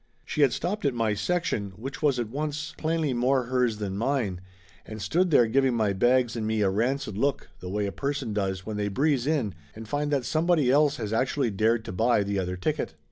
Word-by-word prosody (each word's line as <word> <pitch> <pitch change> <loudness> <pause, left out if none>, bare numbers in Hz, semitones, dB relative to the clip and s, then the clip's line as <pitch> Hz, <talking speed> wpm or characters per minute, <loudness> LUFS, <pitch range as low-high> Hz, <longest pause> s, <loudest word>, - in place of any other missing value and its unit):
She 150 - -2
had 140 -3 +5
stopped 180 - -2
at 140 -4 +1
my 115 -2 +1
section, 105 - -1
which 135 - -7
was 145 -4 +2
at 120 -2 -1
once 150 +4 -3
Laughter 155 - -6
Limited 165 +1 +1
57 120 - -1
plainly 125 - +1
more 135 -1 +3
hers 125 -2 0
than 100 -2 -4
mine, 115 -8 -1 0.4
and 110 0 -8
stood 170 - +1
there 130 -7 +5
giving 130 +2 +2
my 110 -3 +1
bags 120 +4 +2
and 110 -2 -2
me 110 -1 0
a 95 -2 +3
rancid 115 0 -1
look 140 +2 -1
the 90 - -7
way 105 +2 -1
a 100 - -2
person 140 -2 -3
does 95 -2 -2
when 110 -1 -4
they 105 0 -1
breeze 135 +4 +1
in 135 - 0 0.2
and 110 0 -9
find 145 +4 -1
that 140 -4 0
somebody 155 -4 +2
else 145 +1 +4
has 110 -2 -4
actually 130 +1 +1
dared 110 +3 +1
to - - -5
buy 110 +3 +2
the 100 0 -1
other 90 0 -3
ticket. 90 - -2
120 Hz, 235 wpm, -27 LUFS, 105-140 Hz, 0.4 s, had